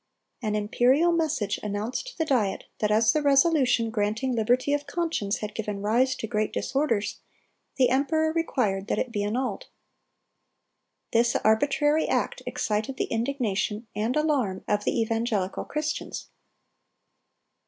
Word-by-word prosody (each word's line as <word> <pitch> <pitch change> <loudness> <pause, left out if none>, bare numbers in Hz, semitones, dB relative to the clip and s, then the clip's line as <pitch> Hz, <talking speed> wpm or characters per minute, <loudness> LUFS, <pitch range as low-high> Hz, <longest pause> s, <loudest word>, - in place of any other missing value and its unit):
An 215 -3 -1
imperial 250 +10 +3
message 310 -12 0
announced 210 - -3
to - - -10
the 320 - 0
Diet 235 -10 +1 0.2
that 210 - +1
as 220 +3 +4
the 305 - +1
resolution 275 -5 +3
granting 220 +4 -1
liberty 245 +5 +2
of 290 0 -1
conscience 300 - -2
had 210 0 -4
given 210 -2 -4
rise 245 +5 +2
to - - -5
great 215 0 -1
disorders, 255 -7 -1 0.6
the 255 -3 +3
emperor 315 +4 +1
required 215 -12 0
that - - 0
it 255 - -1
be 205 -3 -1
annulled. 245 +5 -2 1.5
This 235 +1 +3
arbitrary 290 +7 +2
act - - -1
excited 215 +5 -2
the - - -2
indignation 225 -3 -1
and 220 +4 -1
alarm 275 -11 0
of 205 0 0
the - - +1
evangelical 225 -4 -1
Christians. 300 0 -4
235 Hz, 135 wpm, -26 LUFS, 210-285 Hz, 1.5 s, as